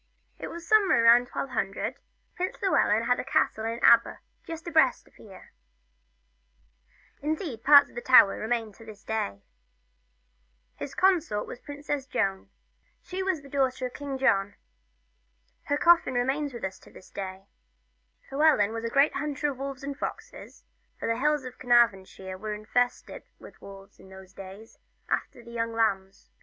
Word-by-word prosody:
IT - - -6
was 340 0 -9
somewhere 400 - +4
about 240 +1 +5
1200, 225 -7 -3 0.4
Prince 365 +1 -3
Llewellyn 230 - +2
had 245 +1 +1
a - - -2
castle 220 -4 0
at 230 +1 -5
Aber, 235 0 +5 0.3
just 330 0 -8
abreast 315 -6 +2
of - - -23
us - - -23
here; 195 -4 -15 1.7
indeed, 300 - -4
parts 285 0 +7
of - - -21
the 240 - -6
towers 245 -7 +6
remain 225 -1 -2
to 225 - -16
this 215 -2 -13
day. 100 - -3 1.3
His 280 - -8
consort 350 - +1
was - - -9
the - - -37
Princess 290 -1 -5
Joan; 195 -6 -2 0.5
she 370 +1 -5
was 375 -5 -1
King 270 0 -3
John's - - -16
daughter. 200 -7 +1 1.1
Her 285 - 0
coffin 340 -5 +4
remains 270 +4 -1
with 235 -2 -9
us 190 0 -5
to - - -18
this 185 - -16
day. 190 -1 -7 0.9
Llewellyn 275 -8 +3
was 225 0 -5
a 230 - -2
great 275 +4 +3
hunter 290 0 -2
of 265 - -11
wolves 275 -1 -6
and 280 0 -5
foxes, 445 - -8 0.3
for - - -4
the 230 +1 -1
hills 300 0 +1
of 255 - -10
Carnarvonshire 195 -6 +1
were 215 +1 -4
infested 245 +4 -2 0.2
with - - -15
wolves 195 0 -13
in 190 - -16
those 190 0 -14
days, 195 +3 -12 0.3
after 240 - -3
the 235 - -13
young 230 -1 -3
lambs. 195 -4 -2
245 Hz, 160 wpm, -27 LUFS, 210-285 Hz, 1.7 s, parts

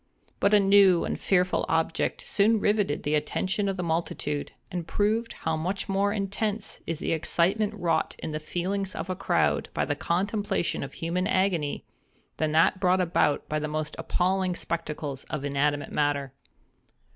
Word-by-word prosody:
But 200 +1 +4
a - - +7
new 195 -3 +5
and - - -3
fearful 180 -1 +2
object 160 0 0
soon 215 +2 +3
rivetted 205 -7 +1
the 145 - 0
attention 190 +6 0
of 195 - -2
the 180 - -2
multitude, 160 -3 -2 0.2
and 175 -2 -4
proved 220 +3 0
how 160 0 -2
much 180 +5 -2
more 200 +1 +1
intense 205 +1 -3
is 165 - -2
the - - -2
excitement 195 +6 +1
wrought 165 -5 0
in - - -5
the 155 - -3
feelings 185 +5 -3
of 185 - -4
a - - -2
crowd 195 - +1
by - - +1
the - - -1
contemplation 200 0 -1
of 140 - -6
human 175 +3 -1
agony, 185 -6 0 0.5
than 155 -1 0
that 165 +4 +4
brought 185 -1 +3
about 165 -5 +1
by 155 - -1
the 150 - -2
most 155 0 -3
appalling 185 0 0
spectacles 150 -5 -4
of 145 -2 -4
inanimate 145 +1 0
matter. 145 -3 0
180 Hz, 165 wpm, -27 LUFS, 155-195 Hz, 0.5 s, a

